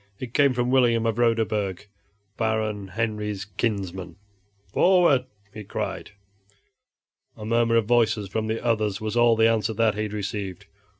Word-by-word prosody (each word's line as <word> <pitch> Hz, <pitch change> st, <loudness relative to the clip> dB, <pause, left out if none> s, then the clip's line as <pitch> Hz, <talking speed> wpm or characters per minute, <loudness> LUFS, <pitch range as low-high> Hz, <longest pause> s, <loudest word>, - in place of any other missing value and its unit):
It 125 Hz, -2 st, -7 dB
came 140 Hz, -3 st, +4 dB
from 125 Hz, 0 st, 0 dB
William 120 Hz, -3 st, +3 dB
of 115 Hz, 0 st, -1 dB
Roderburg, 110 Hz, -5 st, 0 dB, 0.5 s
Baron 110 Hz, -3 st, -1 dB
Henry's 105 Hz, -1 st, -3 dB
kinsman. 95 Hz, -4 st, -3 dB, 0.6 s
"Forward!" 175 Hz, -8 st, +4 dB, 0.3 s
he 105 Hz, -, -8 dB
cried. -, -, -5 dB, 1.3 s
A 105 Hz, -, -8 dB
murmur 115 Hz, +1 st, +2 dB
of 115 Hz, -2 st, +3 dB
voices 110 Hz, -3 st, +2 dB
from 110 Hz, +3 st, -3 dB
the 110 Hz, +2 st, -3 dB
others 110 Hz, -4 st, 0 dB
was 110 Hz, 0 st, -4 dB
all 120 Hz, -1 st, +5 dB
the 110 Hz, 0 st, +4 dB
answer 110 Hz, -1 st, 0 dB
that 110 Hz, -1 st, +2 dB
he 110 Hz, +1 st, -2 dB
received. 100 Hz, -2 st, -5 dB
110 Hz, 140 wpm, -24 LUFS, 105-115 Hz, 1.3 s, all